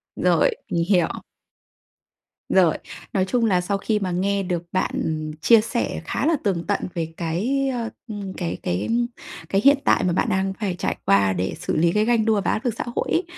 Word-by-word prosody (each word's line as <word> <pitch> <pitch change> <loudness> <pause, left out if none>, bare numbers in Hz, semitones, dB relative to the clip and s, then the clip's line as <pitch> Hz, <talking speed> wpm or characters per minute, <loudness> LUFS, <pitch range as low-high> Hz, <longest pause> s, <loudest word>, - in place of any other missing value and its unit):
Rồi, - - +3 0.2
mình 170 - +1
hiểu. 180 -5 +4 1.4
Rồi. 180 -4 +4 0.4
Nói 190 -2 +2
chung 235 +4 +1
là 185 -5 +3
sau 200 +2 -1
khi 210 +1 0
mà 185 -2 -2
nghe 195 +2 0
được 175 -2 -2
bạn 185 - 0 0.5
chia 230 +3 +6
sẻ 235 +2 -2
khá - - -2
là 325 +1 +3
tường 185 -5 0
tận 205 - +1
về 165 -2 -3
cái, 225 +12 0
ơ, 230 -2 -3 0.2
ừm, 205 -4 -6
cái 175 -3 -3
cái 90 +2 -1 0.6
cái 195 +1 +2
hiện 280 +1 +7
tại - - +4
mà 180 - +1
bạn - - +1
đang 190 0 0
phải 200 -5 -1
trải - - -2
qua 100 -1 +4
để 90 +1 -2
xử - - -2
lý 170 +2 +3
cái 210 +2 +2
ganh 230 -2 +2
đua 215 -3 +2
và - - 0
áp 220 - -2
lực 240 - +1
xã - - -2
hội - - -1
ấy 345 - +2
195 Hz, 205 wpm, -23 LUFS, 175-220 Hz, 1.4 s, hiện